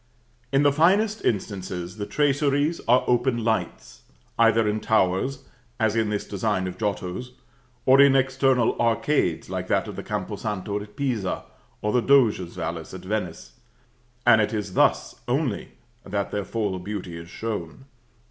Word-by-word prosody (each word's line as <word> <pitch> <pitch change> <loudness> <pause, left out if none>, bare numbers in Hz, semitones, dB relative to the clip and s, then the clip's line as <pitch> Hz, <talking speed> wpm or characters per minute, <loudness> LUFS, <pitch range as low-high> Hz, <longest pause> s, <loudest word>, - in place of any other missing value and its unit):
In 135 +1 +3
the 145 - +5
finest 200 +9 +2
instances, 95 -3 -3
the 100 -1 -4
traceries 145 +2 +1
are 125 +2 +5
open 120 -1 +1
lights, 110 -6 -2 0.4
either 115 -1 +4
in 105 +1 0
towers, 110 +4 +1 0.4
as 110 -1 +2
in 110 -2 +1
this 105 -1 -2
design 100 -1 -1
of 90 - -5
Giotto's 105 +3 -3 0.5
or 135 +1 +7
in 140 -1 +6
external 130 -2 +2
arcades 115 - +1
like - - -4
that - - +1
of - - -7
the - - -5
Campo - - -4
Santo 105 -1 -3
at 105 0 -12
Pisa 120 -10 -2 0.4
or 105 - +1
the 125 - +3
Doge's 115 -10 +3
palace 80 +1 -5
at 95 - -8
Venice; 90 - -4 0.7
and 110 -2 +6
it 105 - -1
is 105 -3 -4
thus - - +2
only - - -1 0.3
that 100 0 -3
their 100 -1 -2
full 105 -5 -2
beauty 90 -2 -6
is 85 0 -9
shown. 110 +2 -5
110 Hz, 155 wpm, -25 LUFS, 95-130 Hz, 0.7 s, or